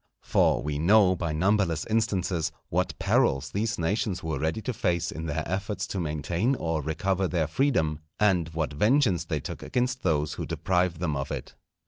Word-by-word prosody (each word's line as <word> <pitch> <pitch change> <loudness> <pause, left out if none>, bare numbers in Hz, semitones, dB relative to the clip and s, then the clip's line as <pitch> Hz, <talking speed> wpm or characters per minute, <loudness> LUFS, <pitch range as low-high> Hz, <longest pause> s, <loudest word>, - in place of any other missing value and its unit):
For - - +2
we 75 0 -2
know 95 +2 +5
by 85 -2 -2
numberless 85 -1 +1
instances, 95 -7 0 0.2
what - - -1
perils 65 - +2
these 110 +3 -1
nations 95 +2 -1
were 80 -4 -2
ready 80 +7 -1
to 125 - -2
face 85 -5 0
in 80 +1 -5
their 75 +1 -2
efforts 100 +3 -2
to 95 - -3
maintain 85 - 0
or 80 -7 -1
recover 95 +5 0
their 85 -3 0
freedom, 80 - +1 0.2
and 90 -6 +3
what 80 -2 -2
vengeance 105 - +3
they 80 -3 -2
took - - -7
against 125 0 -1
those 75 -4 +1
who - - -5
deprived 90 -3 0
them 80 -4 0
of 70 0 -3
it. - - -5
85 Hz, 175 wpm, -27 LUFS, 80-105 Hz, 0.2 s, know